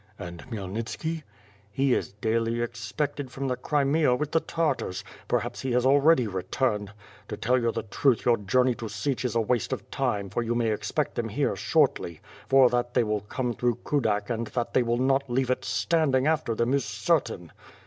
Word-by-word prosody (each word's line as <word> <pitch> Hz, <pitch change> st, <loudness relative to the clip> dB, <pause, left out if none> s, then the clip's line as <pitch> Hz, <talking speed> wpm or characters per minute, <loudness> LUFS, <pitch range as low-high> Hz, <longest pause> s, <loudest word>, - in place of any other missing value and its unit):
"And 85 Hz, -1 st, -7 dB
Khmyelnitski?'' 115 Hz, -, -4 dB, 0.5 s
"He 135 Hz, +5 st, +1 dB
is -, -, -1 dB
daily 115 Hz, +2 st, 0 dB
expected 120 Hz, +5 st, -3 dB
from 135 Hz, +2 st, -4 dB
the 125 Hz, -, 0 dB
Crimea 145 Hz, +1 st, +2 dB
with 150 Hz, +3 st, -3 dB
the 165 Hz, -, +3 dB
Tartars; 155 Hz, -, -1 dB, 0.2 s
perhaps 120 Hz, 0 st, -1 dB
he 130 Hz, -2 st, -2 dB
has 125 Hz, +1 st, +2 dB
already 140 Hz, 0 st, +5 dB
returned. 105 Hz, +2 st, -1 dB, 0.4 s
To -, -, -5 dB
tell 120 Hz, -1 st, +2 dB
the -, -, -3 dB
truth 120 Hz, +3 st, +1 dB
your 120 Hz, -1 st, +4 dB
journey 125 Hz, +6 st, +2 dB
to 115 Hz, -1 st, -6 dB
Sich 115 Hz, +6 st, -2 dB
is 120 Hz, -2 st, 0 dB
waste 115 Hz, 0 st, 0 dB
of -, -, -5 dB
time 100 Hz, -2 st, -1 dB
for 120 Hz, -, -1 dB
you 120 Hz, 0 st, -1 dB
may 115 Hz, -2 st, +1 dB
expect 105 Hz, -, -1 dB
them -, -, -2 dB
here -, -, 0 dB
shortly; 85 Hz, -2 st, +1 dB, 0.3 s
for 135 Hz, -1 st, +7 dB
that 120 Hz, 0 st, -1 dB
they 125 Hz, -, +4 dB
will 105 Hz, -2 st, -1 dB
come 120 Hz, +4 st, -3 dB
through 120 Hz, 0 st, 0 dB
Kudak 110 Hz, -7 st, 0 dB
and 115 Hz, 0 st, -2 dB
that 120 Hz, +1 st, -3 dB
they -, -, +4 dB
will 120 Hz, 0 st, 0 dB
not 135 Hz, +1 st, +1 dB
leave 130 Hz, +1 st, +1 dB
it 130 Hz, -, -1 dB
standing 145 Hz, -6 st, +1 dB
after 155 Hz, -7 st, +1 dB
them 120 Hz, +3 st, +1 dB
is 140 Hz, -2 st, +2 dB
certain.'' 110 Hz, -, -1 dB
120 Hz, 185 wpm, -27 LUFS, 110-135 Hz, 0.5 s, for